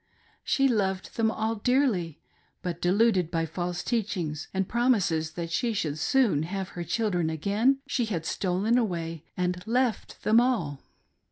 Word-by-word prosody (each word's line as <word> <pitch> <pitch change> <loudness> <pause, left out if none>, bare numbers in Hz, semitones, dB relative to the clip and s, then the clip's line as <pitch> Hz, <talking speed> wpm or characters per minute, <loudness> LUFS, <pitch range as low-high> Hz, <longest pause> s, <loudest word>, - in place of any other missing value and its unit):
She 275 -1 +3
loved 195 -6 -1
them 225 -1 +2
all 220 0 -1
dearly, 220 - +1 0.4
but 175 -1 -4
deluded 190 -1 +3
by 165 -1 0
false 175 +2 -3
teach 225 -3 -1
ings, 155 -3 -3
and 190 -1 -1
promises 195 -10 +1
that 170 -1 -5
she 230 +6 0
should 155 -7 -2
soon 235 - +3
have 190 +3 -3
her 175 - -5
children 180 -5 0
again, 210 - +1
she 260 -4 0
had 175 -7 -3
stolen 200 +8 +1
away 165 -7 -3
and 180 0 -1
left 245 -2 -1
them 225 +2 +5
all. 175 - 0
190 Hz, 155 wpm, -27 LUFS, 170-230 Hz, 0.4 s, them